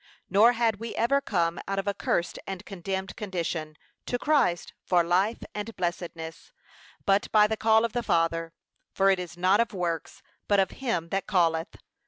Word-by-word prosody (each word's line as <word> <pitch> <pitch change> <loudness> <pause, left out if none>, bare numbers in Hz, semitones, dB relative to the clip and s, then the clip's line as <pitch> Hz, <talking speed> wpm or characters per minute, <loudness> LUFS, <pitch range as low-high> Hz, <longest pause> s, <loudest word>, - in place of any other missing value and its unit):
Nor 220 +5 +6
had 230 -3 +1
we 230 +2 -6
ever 275 +4 +2
come 170 -7 0
out 195 0 -2
of 195 - -2
a 200 - +1
cursed 175 -2 -1
and 195 0 -6
condemned 190 0 -4
condition, 170 -6 -3 0.3
to 245 - 0
Christ, 260 - +1
for 175 -2 +3
life 185 +6 +1
and 210 +2 -5
blessedness, 170 -2 -5 0.5
but 195 +1 +2
by 210 -1 +6
the 220 +1 0
call 220 +1 +4
of 230 - -4
the 240 - 0
Father; 165 -4 0 0.4
'For 195 0 +4
it 190 - +1
is 175 -1 -7
not 185 +4 +3
of 235 -3 0
works, 170 -3 -3 0.2
but 205 -1 +3
of 190 - +2
him 225 -11 -2
that 195 +2 -2
calleth.' 165 -4 +1
195 Hz, 180 wpm, -27 LUFS, 170-220 Hz, 0.5 s, Nor